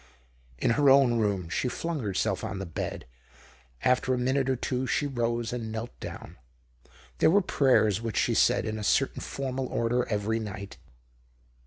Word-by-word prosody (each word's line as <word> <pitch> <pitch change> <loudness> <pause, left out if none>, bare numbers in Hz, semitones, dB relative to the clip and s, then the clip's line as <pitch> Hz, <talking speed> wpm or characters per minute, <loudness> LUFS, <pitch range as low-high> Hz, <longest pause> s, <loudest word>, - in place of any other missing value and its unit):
In 65 - +1
her 140 +4 +4
own 135 -3 +5
room, 100 -5 0
she 85 +9 -1
flung 165 +5 -3
herself 105 -6 -1
on - - -4
the 95 -1 -5
hed; - - -4 0.8
after 125 0 +2
a - - -2
minute 130 +2 +1
or 130 - +2
two 130 +1 -2
she 145 - 0
rose 120 -3 -1
and 115 -3 -4
knelt 115 +2 -5
down. - - -8 0.8
There - - +5
were 195 +5 +5
prayers 115 - +3
which 115 -1 -4
she - - +2
said - - +3
in 110 0 -3
a - - -5
certain 135 +6 +1
formal 135 -1 -3
order 120 +1 0
every 110 +1 0
night. 100 -2 -7
120 Hz, 170 wpm, -28 LUFS, 110-130 Hz, 0.8 s, own